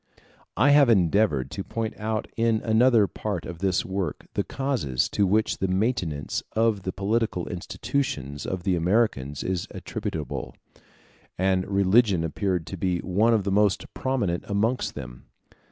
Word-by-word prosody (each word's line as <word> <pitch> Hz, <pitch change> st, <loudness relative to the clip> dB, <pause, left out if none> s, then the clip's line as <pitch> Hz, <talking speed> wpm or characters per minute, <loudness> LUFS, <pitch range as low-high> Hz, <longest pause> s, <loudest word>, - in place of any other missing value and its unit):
I 145 Hz, -, +5 dB
have 145 Hz, -3 st, +6 dB
endeavored 90 Hz, -, +3 dB
to 95 Hz, -, -4 dB
point 110 Hz, +1 st, -3 dB
out 110 Hz, 0 st, -2 dB
in 115 Hz, -1 st, +2 dB
another 115 Hz, -1 st, +4 dB
part 100 Hz, -3 st, -4 dB
of 85 Hz, -2 st, -7 dB
this 95 Hz, -1 st, +1 dB
work 95 Hz, -4 st, -3 dB
the -, -, 0 dB
causes 125 Hz, -, -1 dB
to 100 Hz, -, +1 dB
which 105 Hz, +3 st, +1 dB
the 95 Hz, -, 0 dB
maintenance 95 Hz, -, -1 dB
of 110 Hz, -2 st, +2 dB
the 95 Hz, -, -3 dB
political 100 Hz, -2 st, -1 dB
institutions 90 Hz, -, -3 dB
of 95 Hz, -2 st, -3 dB
the 95 Hz, -1 st, +1 dB
Americans 85 Hz, -, 0 dB
is 90 Hz, -2 st, -2 dB
attributable; -, -, -5 dB, 0.8 s
and 95 Hz, 0 st, +1 dB
religion 100 Hz, -1 st, +3 dB
appeared 90 Hz, +1 st, -1 dB
to 95 Hz, -, -7 dB
be 90 Hz, 0 st, 0 dB
one 110 Hz, +6 st, +2 dB
of 105 Hz, -, +1 dB
the 100 Hz, -, -1 dB
most 100 Hz, 0 st, +1 dB
prominent 110 Hz, -10 st, -1 dB
amongst 110 Hz, +5 st, 0 dB
them. 65 Hz, -4 st, -9 dB
100 Hz, 150 wpm, -25 LUFS, 90-110 Hz, 0.8 s, have